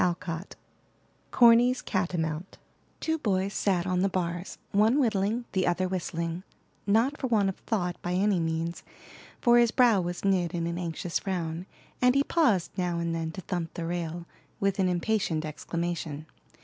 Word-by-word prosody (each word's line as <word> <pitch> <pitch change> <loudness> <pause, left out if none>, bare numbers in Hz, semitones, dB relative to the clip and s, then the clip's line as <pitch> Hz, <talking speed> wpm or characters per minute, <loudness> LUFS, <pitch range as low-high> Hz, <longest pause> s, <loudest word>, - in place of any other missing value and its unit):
CORNY'S 240 +1 +5
CATAMOUNT 175 -2 -2 0.4
Two 320 0 -1
boys 195 -4 0
sat 185 -3 +1
on 185 -1 0
the 195 - +2
bars, 175 0 -3
one 215 +6 +4
whittling, 225 -1 +1
the 190 -2 +1
other 175 +1 +1
whistling, 170 -2 -3 0.5
not 230 +8 +2
for 265 - -1
want 210 -5 +2
of 190 - -5
thought 180 -6 -2
by 175 - -2
any 195 0 +2
means, 165 +1 -2 0.6
for 240 -1 +6
his 235 -1 +5
brow 230 -4 +4
was 175 +2 -4
knit 180 -3 +1
in 170 -1 -1
an 170 +1 -3
anxious 170 0 -2
frown, 175 -2 -3 0.3
and 250 +1 +5
he 280 - +4
paused 250 - +2
now 175 -2 0
and 170 0 -1
then 165 -1 -2
to 190 - -6
thump 175 -3 -4
the 170 - -3
rail, 170 0 -3 0.3
with 195 0 0
an 185 -1 +3
impatient 175 -3 0
exclamation. 155 0 -4
185 Hz, 160 wpm, -28 LUFS, 170-210 Hz, 0.6 s, for